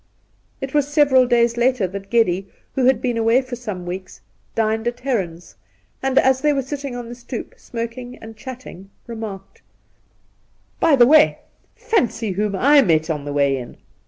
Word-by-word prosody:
It 270 Hz, 0 st, -5 dB
was 290 Hz, -2 st, +2 dB
several 285 Hz, -4 st, +4 dB
days 235 Hz, -1 st, +2 dB
later 245 Hz, -3 st, +2 dB
that 195 Hz, +1 st, -8 dB
Geddy, 195 Hz, -5 st, +1 dB, 0.2 s
who 260 Hz, -, +1 dB
had 260 Hz, +1 st, +3 dB
been 245 Hz, -2 st, 0 dB
away 230 Hz, +3 st, +3 dB
for 255 Hz, -1 st, -6 dB
some 210 Hz, -7 st, -6 dB
weeks, 185 Hz, +1 st, -7 dB, 0.4 s
dined 220 Hz, 0 st, 0 dB
at 240 Hz, +1 st, -3 dB
Heron's, 180 Hz, -, -3 dB, 0.5 s
and, 270 Hz, 0 st, -1 dB
as 260 Hz, 0 st, +4 dB
they 300 Hz, -1 st, +3 dB
were 275 Hz, -1 st, -1 dB
sitting 275 Hz, -1 st, -5 dB
on 245 Hz, -1 st, -6 dB
the 240 Hz, -, -7 dB
stoep 240 Hz, -, -7 dB
smoking 240 Hz, -, -6 dB
and 225 Hz, 0 st, -11 dB
chatting, 240 Hz, -6 st, -10 dB, 0.2 s
remarked: 220 Hz, -4 st, -8 dB, 0.6 s
' -, -, -41 dB
By 295 Hz, -, +6 dB
the 245 Hz, -3 st, +7 dB
way, 305 Hz, +4 st, +5 dB, 0.4 s
fancy 405 Hz, -, 0 dB
whom 200 Hz, +2 st, -1 dB
I 285 Hz, +8 st, +5 dB
met 160 Hz, -6 st, +2 dB
on 150 Hz, -2 st, -4 dB
the 145 Hz, -, -4 dB
way 140 Hz, -1 st, +2 dB
in 125 Hz, -2 st, -8 dB
235 Hz, 175 wpm, -21 LUFS, 195-260 Hz, 0.6 s, the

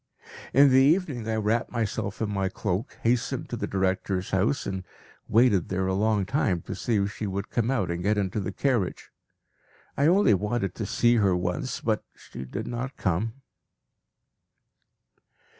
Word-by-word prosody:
In 140 Hz, +1 st, +6 dB
the 130 Hz, -, +6 dB
evening 145 Hz, -, +2 dB
I 110 Hz, -, 0 dB
wrapped 110 Hz, +3 st, 0 dB
myself 110 Hz, -3 st, -2 dB
in 105 Hz, -, -2 dB
my 95 Hz, -1 st, 0 dB
cloak, 100 Hz, +1 st, -3 dB
hastened 115 Hz, +1 st, 0 dB
to -, -, -3 dB
the -, -, -3 dB
director's 95 Hz, 0 st, -1 dB
house, 105 Hz, +9 st, +1 dB
and 95 Hz, -1 st, -3 dB, 0.4 s
waited 110 Hz, -5 st, +3 dB
there 95 Hz, 0 st, 0 dB
a 95 Hz, -, 0 dB
long 105 Hz, 0 st, +1 dB
time 100 Hz, -, 0 dB
to -, -, -5 dB
see 120 Hz, -, -1 dB
if 100 Hz, 0 st, 0 dB
she 105 Hz, -, -4 dB
would 100 Hz, +1 st, -4 dB
come 120 Hz, 0 st, 0 dB
out 100 Hz, -10 st, 0 dB
and 85 Hz, 0 st, -3 dB
get 105 Hz, +3 st, +1 dB
into 100 Hz, +1 st, -1 dB
the 95 Hz, -, -3 dB
carriage. 120 Hz, -10 st, -1 dB, 0.8 s
I 140 Hz, -, +3 dB
only 180 Hz, -, +5 dB
wanted 105 Hz, -1 st, -1 dB
to 110 Hz, -, -4 dB
see 120 Hz, +3 st, +3 dB
her 100 Hz, -4 st, +3 dB
once, 130 Hz, -, -3 dB
but 110 Hz, -2 st, 0 dB
she 65 Hz, -, -9 dB
did 105 Hz, -, -5 dB
not 120 Hz, +3 st, -5 dB
come. 110 Hz, +8 st, -1 dB
105 Hz, 170 wpm, -26 LUFS, 95-120 Hz, 0.8 s, In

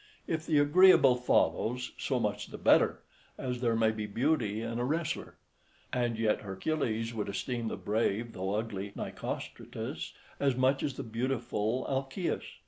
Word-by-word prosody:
If 160 Hz, 0 st, -2 dB
the 155 Hz, -, +3 dB
agreeable 145 Hz, -2 st, +7 dB
follows, 125 Hz, 0 st, +1 dB
so 130 Hz, -3 st, -1 dB
much 105 Hz, -2 st, -1 dB
the -, -, -8 dB
better, -, -, +4 dB, 0.3 s
as 125 Hz, -1 st, -3 dB
there 115 Hz, -2 st, +2 dB
may 110 Hz, -1 st, +3 dB
be 110 Hz, -1 st, -4 dB
beauty 115 Hz, -2 st, +1 dB
in 115 Hz, +1 st, -3 dB
a -, -, 0 dB
wrestler. 155 Hz, +5 st, -2 dB, 0.6 s
And 120 Hz, -2 st, 0 dB
yet 110 Hz, -1 st, +1 dB
Hercules 115 Hz, +2 st, -2 dB
would 105 Hz, -3 st, -3 dB
esteem 115 Hz, +3 st, -2 dB
the -, -, -3 dB
brave 110 Hz, +2 st, 0 dB
though 95 Hz, +2 st, -2 dB
ugly 105 Hz, -3 st, -3 dB
Nicostratus -, -, -5 dB, 0.3 s
as 140 Hz, -3 st, +2 dB
much 130 Hz, +2 st, +2 dB
as 140 Hz, -, -2 dB
the -, -, -5 dB
beautiful 115 Hz, 0 st, -1 dB
Alcaeus. 135 Hz, +6 st, -2 dB
120 Hz, 150 wpm, -31 LUFS, 110-135 Hz, 0.6 s, agreeable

